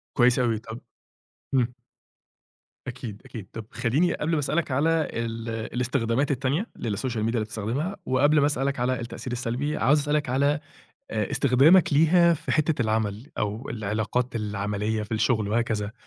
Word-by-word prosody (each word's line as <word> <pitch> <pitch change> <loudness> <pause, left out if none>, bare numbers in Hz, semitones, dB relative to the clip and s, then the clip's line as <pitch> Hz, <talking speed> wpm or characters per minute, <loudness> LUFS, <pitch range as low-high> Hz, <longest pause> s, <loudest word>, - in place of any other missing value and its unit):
كويس 125 0 +4
أوي 115 -3 +1
طَب، 115 +1 -9 0.7
امم. 125 -2 +2 1.1
أكيد، 120 -5 -7
أكيد، 105 -5 -8
طَب 115 -1 -6
خلّيني، 130 +9 +1
قبل 160 +2 -2
ما 160 - +2
أسأل 145 +2 -1
لك 170 -4 0
على 160 +4 +2
ال 115 0 -4
الإستخدامات 120 +3 -1
التانية 140 - 0 0.2
للSocial 115 +3 -2
Media، - - -6
اللي 115 +1 0
بتستخدمها، 115 - -3
وقبل 145 +4 +4
ما 145 - +4
أسأل 135 -2 0
لك 140 -3 -2
على 125 0 0
التأثير 120 +1 -6
السلبي، 130 +5 -2
عاوز 150 +3 +4
أسأل 145 +1 -1
لك 145 -3 0
على 140 +3 +2 0.5
آآ 105 -3 -1
إستخدامك 145 +6 +5
ليها 170 +3 +5
في 150 +1 -4
حتة 155 -4 +2
العَمل، 110 +2 -1
أو 105 +4 -2
العلاقات 110 +3 -2
العَملية 105 +1 -2
في 105 - -7
الشُغل، 110 -1 +1
وهكذا، 110 -2 -1
125 Hz, 160 wpm, -26 LUFS, 110-145 Hz, 1.1 s, إستخدامك